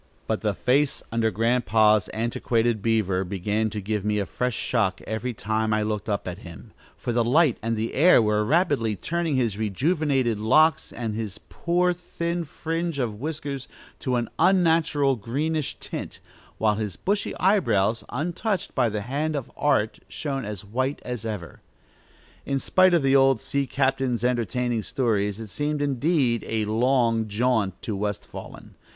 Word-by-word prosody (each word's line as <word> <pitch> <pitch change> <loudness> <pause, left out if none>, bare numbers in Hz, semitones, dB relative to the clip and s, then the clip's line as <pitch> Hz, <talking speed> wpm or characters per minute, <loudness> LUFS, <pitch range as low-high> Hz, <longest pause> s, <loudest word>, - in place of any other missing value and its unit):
But 110 - -1
the 105 -3 0
face 140 +5 +1
under 115 -1 +1
Grandpa's 110 -1 +3
antiquated 115 0 0
beaver 100 -4 +1
began 105 +4 -1
to 105 - -4
give 105 0 -2
me 105 0 0
a 100 - 0
fresh 125 +4 -2
shock 100 -6 0
every 110 +3 -3
time 110 0 -1
I 105 - +1
looked 105 0 -3
up 100 -2 -2
at 90 +1 -5
him, 85 -4 -12 0.3
for 120 - -3
the 120 0 +2
light 140 +2 +3
and 115 0 -1
the 110 +2 -2
air 170 +2 +6
were 105 -1 +2
rapidly 140 - +2
turning 165 - -1
his 115 -5 0
rejuvenated 130 - +1
locks 155 +9 +3
and 115 -3 -4
his 110 -3 -4
poor, 180 +1 0
thin 170 -1 -3
fringe 165 +1 -3
of 115 -6 -2
whiskers 145 -3 -4 0.3
to 130 -2 -1
an 120 -1 0
unnatural 160 -7 +3
greenish 145 +7 -2
tint, - - -6 0.4
while 105 -1 +2
his 105 -4 -3
bushy 200 - -2
eyebrows, 120 - +2
untouched 175 - -2
by 125 -3 +2
the 105 -1 -3
hand 145 +7 -2
of 140 -4 -4
art, 110 -7 +1
shone 135 -5 -4
as 105 -1 -6
white 130 +7 -1
as 120 -3 -4
ever. 100 -7 -6 0.8
In 140 - -1
spite 185 +6 +4
of 165 - +2
the 135 0 +4
old 135 -3 +5
sea 140 +3 -2
captain's 130 -4 0
entertaining 120 -1 0
stories, 105 -5 0
it 110 -2 -7
seemed, 150 0 -1
indeed, 140 -3 +1
"a 110 -1 0
long 115 0 +2
jaunt" 110 -3 0
to 110 - -3
West 105 0 -3
Wallen. - - -10
120 Hz, 160 wpm, -25 LUFS, 110-145 Hz, 0.8 s, air